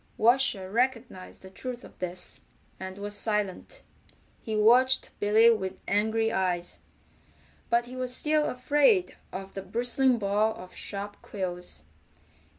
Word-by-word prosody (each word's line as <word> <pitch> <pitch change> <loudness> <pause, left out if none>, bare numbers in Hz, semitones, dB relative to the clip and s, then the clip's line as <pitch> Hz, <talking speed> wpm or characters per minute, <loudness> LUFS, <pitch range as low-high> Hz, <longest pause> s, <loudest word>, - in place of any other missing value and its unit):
Washer 225 -5 +3
recognized 235 -6 -2
the 190 - -11
truth 250 +4 -5
of - - -15
this, 180 0 -3 0.4
and 190 0 -7
was 205 0 -4
silent. 210 - -2 0.6
He 220 - -4
watched 250 +5 +4
Billy 220 +3 +5
with 190 -4 -2
angry 220 +2 +1
eyes, 180 -3 -1 0.9
but 235 0 +2
he 250 +1 -10
was 255 -1 -3
still 305 +1 +2
afraid 295 - +2 0.2
of 195 +1 -7
the 195 - -5
bristling 240 +6 +2
ball 210 +1 +1
of 180 0 -11
sharp 205 0 -5
quills. 180 - -5
215 Hz, 130 wpm, -28 LUFS, 190-250 Hz, 0.9 s, Billy